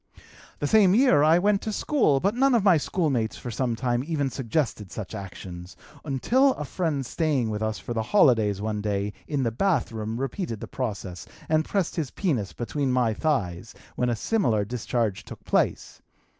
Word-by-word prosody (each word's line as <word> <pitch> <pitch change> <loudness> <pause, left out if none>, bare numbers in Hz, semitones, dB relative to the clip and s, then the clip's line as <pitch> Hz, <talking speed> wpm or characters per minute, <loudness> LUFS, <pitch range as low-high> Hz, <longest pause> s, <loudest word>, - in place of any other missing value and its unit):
"The - - -3
same 195 +2 +5
year 245 - +5
I 155 +3 +5
went 200 +2 +2
to 220 - -3
school, 210 - +2
but 200 +8 +1
none 265 +1 +3
of 225 - +2
my 190 -5 +6
schoolmates 135 -6 -1
for 120 - -6
some 120 0 -1
time 120 +1 -1
even 145 -3 -1
suggested 115 - -2
such - - -6
actions 90 -2 -8 0.3
until 250 - +2
a 150 - -5
friend 150 -4 -2
staying 135 -4 0
with 105 0 -3
us 110 0 -1
for 120 - -6
the 115 - -1
holidays 110 - +3
one 105 -1 -2
day 100 0 -2
in 145 -3 -1
the 115 - 0
bathroom 115 - -1
repeated 135 - -3
the - - -6
process 100 -8 -5 0.2
and 155 0 +2
pressed 195 -4 -1
his 155 -5 -1
penis 125 - -1
between 135 +3 -2
my 125 -3 +2
thighs, 110 - -2 0.2
when 125 - 0
a 120 - +1
similar 115 - +1
discharge 115 -2 -2
took - - -11
place. - - 0
130 Hz, 180 wpm, -26 LUFS, 110-165 Hz, 0.3 s, my